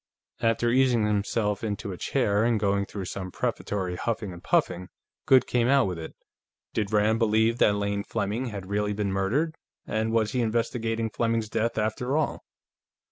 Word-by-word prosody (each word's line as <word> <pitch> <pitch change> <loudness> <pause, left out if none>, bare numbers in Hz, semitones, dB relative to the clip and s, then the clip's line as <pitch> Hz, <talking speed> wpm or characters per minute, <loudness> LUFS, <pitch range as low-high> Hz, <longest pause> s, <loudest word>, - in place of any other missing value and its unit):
After 115 +1 +2
easing 125 -3 +3
himself 105 0 0
into 105 -1 -3
a 90 - -6
chair, 105 -4 +1
and 115 -1 +2
going 100 -1 +1
through 100 -3 -5
some 95 +1 -5
prefatory 95 0 -2
huffing 105 -4 -2
and 85 - -11
puffing, 90 0 +1 0.4
Goode 130 -1 +6
came 120 -1 +1
out 135 0 +4
with 90 -3 -3
it. 80 - -8 0.6
Did 105 -1 -1
Rand 110 +1 +3
believe 110 +1 +2
that 105 - +4
Lane 100 0 -1
Fleming 115 +4 -2
had 100 -5 -6
really 105 +1 -1
been 100 -1 -1
murdered, 115 +13 0 0.3
and 110 +1 -1
was 110 -2 +1
he 125 - 0
investigating 115 0 -1
Fleming's 115 -1 0
death, 115 +2 -1
after 115 +6 0
all? 155 - -1
110 Hz, 170 wpm, -27 LUFS, 100-115 Hz, 0.6 s, Goode